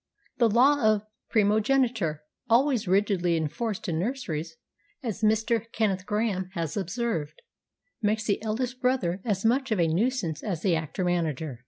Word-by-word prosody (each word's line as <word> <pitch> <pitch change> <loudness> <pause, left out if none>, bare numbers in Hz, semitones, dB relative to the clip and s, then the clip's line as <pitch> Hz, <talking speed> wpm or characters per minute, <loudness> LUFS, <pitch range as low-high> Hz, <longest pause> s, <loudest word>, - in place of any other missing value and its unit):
The 235 -2 +5
law 260 +5 +4
of 215 -1 +3 0.2
primogeniture, 215 - +2 0.3
always 245 -2 +3
rigidly 185 -3 +2
enforced 205 - -3
in 165 -3 -1
nurseries, 165 - -3 0.5
as 225 -3 -4
Mr. 225 +1 +1
Kenneth 195 -4 0
Grahame 210 -4 -1
has 165 -5 -3
observed, 190 -6 -2 0.6
makes 215 0 +1
the 205 -1 0
eldest 245 +4 -3
brother 200 -8 +1
as 205 -3 -1
much 265 +4 +2
of 215 -4 0
a 170 - +3
nuisance 180 - 0
as 180 -6 -4
the 185 -4 +3
actor 160 +3 -3
manager. 160 -7 -1
210 Hz, 145 wpm, -27 LUFS, 170-230 Hz, 0.6 s, The